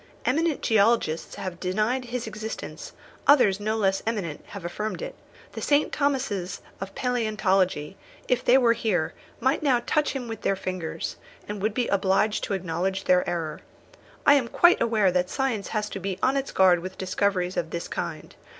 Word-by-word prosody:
Eminent 315 +3 +1
geologists 215 -7 +2
have 180 -2 -6
denied 215 +7 0
his 245 0 -4
existence, 220 0 -6 0.3
others 215 -9 +6
no 215 +2 -1
less 195 -2 +1
eminent 195 -10 -2
have 200 -4 -8
affirmed 210 +5 -3
it. - - -5 0.4
The - - -6
St. 290 +1 +2
Thomases 250 - -1 0.2
of 195 0 -6
palæontology, 195 - 0 0.3
if 250 -1 +1
they 255 - +6
were 240 -3 +5
here, 205 -8 0 0.3
might 265 +5 +1
now 255 -5 +2
touch 300 -1 +1
him 260 -3 -4
with 225 -2 -6
their 195 - +1
fingers, 185 -4 -4 0.3
and 205 -1 -5
would 215 +1 0
be 245 -2 +1
obliged 200 +2 +2
to 200 - -1
acknowledge 190 +2 -2
their 180 0 +3
error. 165 -3 -3 0.6
I 285 - +8
am 270 -4 +3
quite 345 +9 +4
aware 220 -5 +3
that 180 0 +1
science 260 -6 -1
has 210 -1 -2
to - - -4
be 190 0 -3
on 260 +1 +3
its 275 0 -1
guard 185 -2 +5
with 185 +2 -7
discoveries 185 -1 0
of 165 - -1
this 170 +1 -4
kind. - - -5
210 Hz, 175 wpm, -26 LUFS, 185-245 Hz, 0.6 s, I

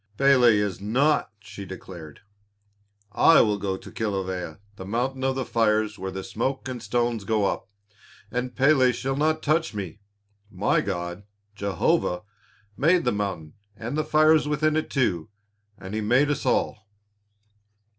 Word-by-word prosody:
"Pélé 130 -4 +5
is 105 -3 -1
nought," 135 +9 +2
she 100 -1 -10
declared, 90 -5 -10 0.9
"I 165 +9 +6
will 105 -2 +1
go 95 -1 -2
to - - -12
Kilawea, 95 -6 -3 0.2
the 95 - -8
mountain 125 +6 -2
of 135 0 +1
the 130 -1 -2
fires 110 -2 +1
where 95 +1 -4
the 95 0 -6
smoke 125 +3 -3
and 125 -2 -5
stones 120 -2 -1
go 105 0 +1
up, 100 - -2 0.6
and 125 +1 -3
Pélé 135 -3 +4
shall 135 +2 -2
not 155 +2 +1
touch 155 -4 +1
me. 100 -2 -5 0.5
My 100 0 +1
God, 90 -1 -4 0.3
Jehovah, 95 -2 0 0.5
made 165 - +3
the 125 - +1
mountain 95 -7 -3 0.2
and 115 +6 -5
the 155 - +1
fires 155 0 +4
within 150 +1 +1
it 155 - -1
too, 95 - 0 0.5
as 95 +2 -9
He 110 - -1
made 125 +7 +3
us 145 - -2
all." 105 -1 0
110 Hz, 150 wpm, -25 LUFS, 100-135 Hz, 0.9 s, I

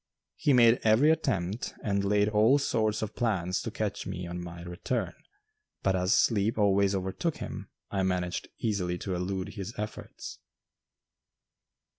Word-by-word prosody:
He 145 - +1
made 120 -2 +6
every 115 +8 +5
attempt, 100 - -1
and 100 -2 0
laid 105 +1 +3
all 110 +6 +4
sorts 110 -6 0
of 110 - -4
plans 95 -6 0
to - - -4
catch - - -3
me 90 +1 -4
on 90 0 -5
my 85 0 -8
return, 90 +3 -3 0.7
but 95 -1 +2
as 90 +4 +2
sleep 110 -1 +2
always 100 -1 +3
overtook 95 - -2
him, - - -7 0.2
I 95 - 0
managed 90 -2 -1
easily 90 -5 -1
to 95 +1 -4
elude 90 +1 -2
his 100 +1 -7
efforts. 105 +1 -7
100 Hz, 145 wpm, -29 LUFS, 90-110 Hz, 0.7 s, made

